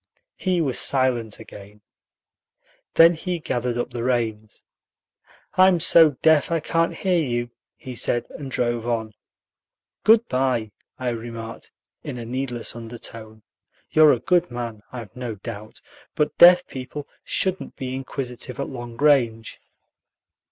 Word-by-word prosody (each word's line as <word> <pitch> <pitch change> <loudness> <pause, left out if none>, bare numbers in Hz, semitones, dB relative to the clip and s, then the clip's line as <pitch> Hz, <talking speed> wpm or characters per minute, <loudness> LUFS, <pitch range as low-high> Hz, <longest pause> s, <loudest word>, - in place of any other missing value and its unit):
He 185 -3 0
was 135 -5 0
silent 125 -5 +1
again. 105 +1 -13 1.1
Then 165 +1 +8
he 175 +2 -3
gathered 125 -6 -2
up 120 - -3
the 120 - -4
reins. 110 -4 -2 0.9
"I'm 185 -1 +6
so 160 -4 +5
deaf 160 -2 +4
I 165 -1 +1
can't 165 +2 0
hear 180 -3 +1
you," 120 -2 -2 0.2
he 130 - -9
said, 120 0 -1
and 140 -2 -7
drove 120 -2 -1
on. 110 -2 -2 0.9
"Good 225 +1 +5
by," 125 -4 0 0.3
I 130 -1 -2
remarked, 115 -1 -7 0.3
in - - -6
a 120 - -6
needless 125 -1 -4
undertone; 115 -2 -9 0.5
"you're 155 -1 +7
a - - -1
good 175 -1 +2
man, 120 -3 -6
I've 115 -6 -9
no 125 -3 -5
doubt, 105 +1 -9 0.3
but 150 - 0
deaf 180 +1 +8
people 135 +2 -7 0.2
shouldn't 190 -1 -1
be 130 -1 -5
inquisitive 130 -1 -5
at 140 - -3
long 120 -3 -8
range." 120 -7 +2
125 Hz, 135 wpm, -23 LUFS, 115-150 Hz, 1.1 s, Then